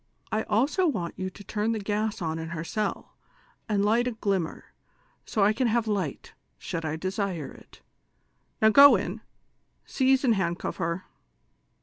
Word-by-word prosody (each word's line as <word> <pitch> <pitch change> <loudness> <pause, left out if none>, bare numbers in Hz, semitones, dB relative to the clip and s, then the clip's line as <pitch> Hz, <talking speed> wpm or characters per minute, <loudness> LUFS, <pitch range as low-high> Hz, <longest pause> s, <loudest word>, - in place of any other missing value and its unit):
I 215 - +1
also 280 - +2
want 180 - -2
you 185 0 -3
to 200 - -13
turn 215 +3 -1
the 220 - -2
gas 210 -1 -2
on 160 0 -2
her 160 0 -5
cell, 210 +4 -3 0.6
and 205 -1 +2
light 235 +4 +2
a 250 - -2
glimmer, 195 -6 -3 0.5
so 215 - -1
1 210 +2 +4
can 250 +2 +1
have 230 0 +1
light, 190 -9 -3 0.2
should 165 - -5
I 155 -1 -2
desire 185 -2 -3
it; - - -17 0.8
now 220 - +8
go 280 +5 +9
in, - - -3 0.6
seize 265 0 +2
and 245 -4 +4
hand 175 -4 0
cuff - - -5
her." 170 +2 -2
205 Hz, 160 wpm, -27 LUFS, 175-225 Hz, 0.8 s, go